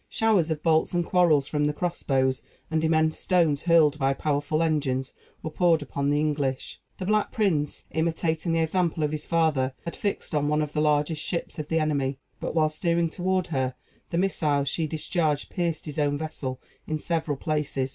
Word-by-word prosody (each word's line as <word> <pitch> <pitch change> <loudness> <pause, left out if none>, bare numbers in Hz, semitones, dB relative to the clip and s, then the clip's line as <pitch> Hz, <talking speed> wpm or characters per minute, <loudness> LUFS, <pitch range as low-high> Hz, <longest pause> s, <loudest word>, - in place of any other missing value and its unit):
Showers 210 -7 +2
of 155 -2 -3
bolts 160 +1 +2
and 175 -1 +1
quarrels 165 -7 +3
from 150 -1 0
the 150 - +1
cross 175 +3 -3
bows, 130 -1 +1 0.3
and 160 0 +1
immense 160 0 +2
stones, 165 -6 +2
hurled 160 -4 +4
by 135 0 +2
powerful 150 +2 0
engines, 140 -5 -1 0.3
were 160 - -4
poured 165 -2 +3
upon 140 -1 -2
the 145 0 +2
English. 145 -3 -2 0.2
The 185 - -5
Black 210 +1 +1
Prince, 175 - 0
imitating 160 +1 0
the 165 0 +2
example 165 -1 0
of 150 - 0
his 155 -1 -4
father, 150 -6 +1
had 170 - -5
fixed 200 -5 -3
on 145 -1 +1
one 150 +1 +2
of 150 - -6
the 150 - +1
largest 150 +1 +1
ships 170 -1 -3
of 150 - -4
the 165 +1 +1
enemy; 140 -3 0 0.2
but, - - -4
while 155 -1 +3
steering 170 +1 0
toward 185 +1 0
her, 130 -2 0 0.3
the 170 - -2
missiles 150 -7 +1
she 160 +3 0
discharged 155 -1 -1
pierced 170 -3 -2
his 150 -1 -5
own 145 -1 +1
vessel 145 -4 -4 0.3
in 155 - -1
several 160 -2 -2
places. 145 -3 -1
155 Hz, 190 wpm, -26 LUFS, 145-170 Hz, 0.3 s, hurled